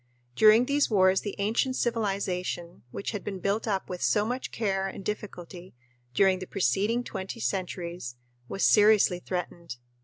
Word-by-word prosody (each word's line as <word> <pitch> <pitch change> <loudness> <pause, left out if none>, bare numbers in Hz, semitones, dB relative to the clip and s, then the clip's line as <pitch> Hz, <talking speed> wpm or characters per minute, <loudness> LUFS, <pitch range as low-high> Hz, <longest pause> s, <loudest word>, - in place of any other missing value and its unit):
During 220 - +6
these 285 +2 +1
wars 190 -3 +4
the 205 - -5
ancient 225 +6 0
civilization, 195 - -2
which 200 - -5
had 210 -3 -5
been 195 -2 -4
built 200 +5 -1
up 195 -3 -1
with 180 -1 -6
so 210 -1 +2
much 250 +3 -3
care 195 -3 -1
and 195 0 -8
difficulty 185 -4 -7 0.4
during 190 +1 +4
the 185 - -7
preceding 210 +5 0
twenty 195 +1 -6
centuries, 175 - -4 0.3
was 195 - -1
seriously 210 -4 +5
threatened. 175 -6 -5
195 Hz, 150 wpm, -27 LUFS, 180-215 Hz, 0.4 s, During